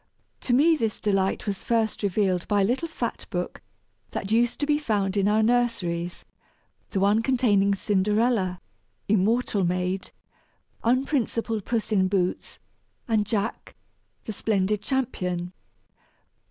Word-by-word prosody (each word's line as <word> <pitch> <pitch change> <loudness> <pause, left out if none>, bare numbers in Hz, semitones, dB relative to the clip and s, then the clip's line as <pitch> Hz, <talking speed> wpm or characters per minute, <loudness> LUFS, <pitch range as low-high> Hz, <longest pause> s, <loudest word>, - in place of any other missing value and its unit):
To - - -3
me 315 +6 +5
this 225 -7 -2
delight 195 -2 0
was 200 -2 -3
first 225 -2 0
revealed 190 -3 0
by 205 -1 +2
a - - +4
little 250 +11 0
fat 325 - -4
book - - -4 0.5
that 195 - -5
used 235 +2 +2
to - - +2
be 295 0 +2
found 205 -8 0
in 200 -1 +2
our 215 +1 +3
nurseries 210 -8 0 0.6
the 195 - -1
one 205 +3 +3
containing 215 -6 +2
Cinderella, 205 -1 +1 0.5
immortal 215 +1 +2
maid 180 +1 -1 0.7
unprincipled 235 -4 0
Puss 230 -2 -2
in 190 -3 +3
Boots 185 -2 -1 0.5
and 215 -3 +1
Jack, 215 +1 -3 0.5
the 220 - -5
splendid 205 -1 0
champion! 185 -9 -2
210 Hz, 125 wpm, -25 LUFS, 190-235 Hz, 0.7 s, me